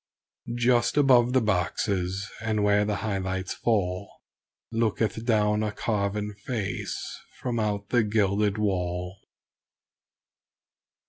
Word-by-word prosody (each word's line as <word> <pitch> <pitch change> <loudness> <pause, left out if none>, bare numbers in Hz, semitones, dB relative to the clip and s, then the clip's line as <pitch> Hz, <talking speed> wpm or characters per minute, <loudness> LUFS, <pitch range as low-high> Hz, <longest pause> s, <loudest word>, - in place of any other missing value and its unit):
(Just 120 +2 +2
above 125 -4 +5
the 130 - +4
boxes 95 -1 0
and 110 -2 0
where 105 0 +4
the 105 0 0
high 100 -3 0
lights 95 0 -3
fall 100 -4 0 0.6
Looketh 110 -1 0
down 105 -2 +2
a 105 -1 -1
carven 105 0 -1
face 105 -1 -4 0.2
from 120 -2 -2
out 105 -2 -1
the 120 - +4
gilded 105 -1 +1
wall.) 90 -2 -1
105 Hz, 110 wpm, -27 LUFS, 100-110 Hz, 0.6 s, above